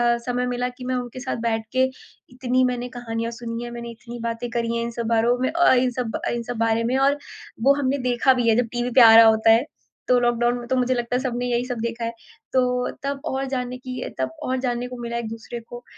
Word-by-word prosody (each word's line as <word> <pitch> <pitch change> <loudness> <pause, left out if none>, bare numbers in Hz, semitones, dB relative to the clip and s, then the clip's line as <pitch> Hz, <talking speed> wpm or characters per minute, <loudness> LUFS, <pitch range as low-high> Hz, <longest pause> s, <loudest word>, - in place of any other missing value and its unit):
अ, - - -3
समय 250 0 -1
मिला 250 0 -1
कि 250 0 -10
मैं 255 0 -1
उनके 250 0 -5
साथ 260 -1 -3
बैठ 225 -1 -1
के 260 0 +3 0.5
इतनी 255 0 +1
मैंने 250 0 -2
कहानियाँ 230 -1 -4
सुनी 230 0 -5
हैं, 240 - -6
मैंने 235 0 -7
इतनी 235 +1 -10
बातें 230 +1 -3
करी 235 -1 -1
हैं 235 - -1
इन 235 - -3
सब 235 0 -4
बारों 235 +2 +3
में 260 +3 +1
अ, 340 -4 +4
इन 250 0 +3
सब 240 -2 -3
इन 235 -1 -3
सब 240 0 -5
बारे 230 0 +1
में 250 +3 +1
और 280 +2 +3 0.5
वो 275 +1 +6
हमने 275 +1 +1
देखा 250 +2 +4
भी 240 -2 +1
है 220 - +4
जब 245 -1 +2
टीवी 240 +1 -1
पे 255 - +8
आ 225 -1 +9
रहा 225 0 +10
होता 220 0 +5
है। 230 +5 +4 0.4
तो 250 - +6
लॉकडाउन 240 0 +1
में 240 -1 -8
तो 260 - +1
मुझे 255 0 +2
लगता 240 0 -2
है 255 - +1
सबने 245 -2 -2
यही 245 0 0
सब 245 -3 -4
देखा 230 0 -3
है। 230 - -2 0.4
तो 250 -1 +1
तब 280 0 -2
और 270 +1 -2
जानने 250 -1 -3
की 255 0 -6 0.2
तब 130 0 0
और 260 0 -1
जानने 245 -1 -2
को 250 0 -8
मिला 235 0 -3
एक 235 -2 -3
दूसरे 230 +1 -7
को। 240 +1 -11
245 Hz, 255 wpm, -23 LUFS, 235-250 Hz, 0.5 s, रहा